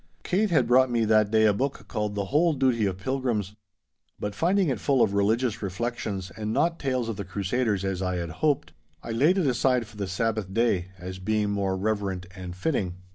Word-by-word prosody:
Kate 205 +3 +1
had 155 -8 +3
brought 130 +2 +4
me 115 -2 +1
that 110 -1 +4
day 110 0 +4
a 105 - +5
book 135 +6 -2
called 105 -2 -2
The 100 -1 -1
Whole 165 +2 +4
Duty 130 -6 +2
of 95 -2 -3
Pilgrims, 110 -3 -2 0.6
but 105 0 -3
finding 180 - +2
it 125 -6 -1
full 135 -1 +3
of 105 -3 +1
religious 110 +4 +1
reflections 100 -1 -3
and 110 0 -3
not 165 +8 +1
tales 130 -4 -1
of 115 -3 -4
the 100 - -3
Crusaders 100 0 -1
as 95 -1 -2
I 90 -1 -1
had 85 -2 -3
hoped, 140 - +1 0.3
I - - -5
laid 150 +12 +3
it 185 - +2
aside 125 -1 +2
for 105 0 -16
the 100 -2 -3
Sabbath 105 +1 -1
day, 100 -5 +1
as 95 +1 -7
being 105 +1 0
more 100 -2 0
reverent 100 -3 -2
and 90 -2 -7
fitting. 95 - -1
110 Hz, 205 wpm, -26 LUFS, 100-130 Hz, 0.6 s, a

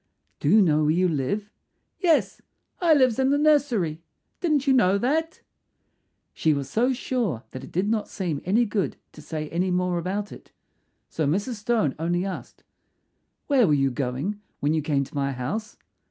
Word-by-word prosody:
"Do 145 - 0
you 210 +4 +6
know 155 -3 +3
where 150 - +2
you 180 +4 +3
live?" 175 +8 -2 0.5
"Yes; 290 - +2 0.4
I 335 -3 +5
lives 255 -4 +3
in 265 0 +3
the 285 - +3
nursery. 255 - +2 0.4
Didn't 305 -6 +1
you 270 - +4
know 200 -6 +4
that?" 315 - -1 0.9
She 155 -2 +1
was 140 -2 -3
so 240 - +1
sure 235 - -2
that 130 - -8
it - - -11
did 185 +4 0
not 215 -1 0
seem 170 -7 -3
any 220 +7 +2
good 205 -3 -1 0.2
to - - -13
say 155 -2 -5
any 180 +3 0
more 180 -1 0
about 200 +4 -3
it. - - -12 0.6
So 155 -3 -2
Mrs. 205 - -1
Stone 210 - +1
only 175 +3 0
asked, 195 - -7 0.8
"Where 265 -7 +4
were 150 - +4
you 135 -1 +2
going 135 +11 -3 0.2
when 145 +2 +1
you 160 - +1
came 145 -2 0
to 135 - -12
my 140 -1 -1
house?" 205 - -4
190 Hz, 180 wpm, -25 LUFS, 155-240 Hz, 0.9 s, you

